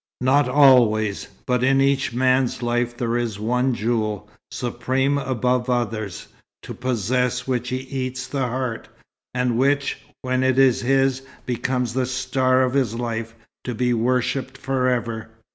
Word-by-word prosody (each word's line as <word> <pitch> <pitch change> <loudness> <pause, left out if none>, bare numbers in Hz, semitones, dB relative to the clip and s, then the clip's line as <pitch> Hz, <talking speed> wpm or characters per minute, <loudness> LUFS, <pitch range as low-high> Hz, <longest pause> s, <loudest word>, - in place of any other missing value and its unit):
"Not 135 +3 +3
always. 115 -7 +4 0.2
But 125 -1 +1
in 135 +1 +4
each 135 -1 +2
man's 130 0 +1
life 120 0 -1
there 120 -1 -1
is 115 -4 -3
one 125 +3 +1
jewel, 110 -2 -1 0.2
supreme 130 +3 -1
above 125 -1 0
others, 110 -7 -2 0.4
to - - -7
possess 125 +1 -1
which 125 -1 -1
he 130 0 -2
eats 130 -1 -4
the 135 -3 -2
heart, 125 -1 -3 0.5
and 125 -2 +1
which, 140 +1 +1 0.2
when 130 0 0
it 130 0 +2
is 135 -2 +4
his, 135 +1 +2 0.2
becomes 125 -1 -1
the 130 0 0
star 130 0 +1
of 130 -1 0
his 130 -5 +1
life, 115 -1 -4 0.3
to 125 - -4
be 125 +1 +1
worshipped 125 +3 0
forever. 125 -4 -1
125 Hz, 145 wpm, -22 LUFS, 120-130 Hz, 0.5 s, always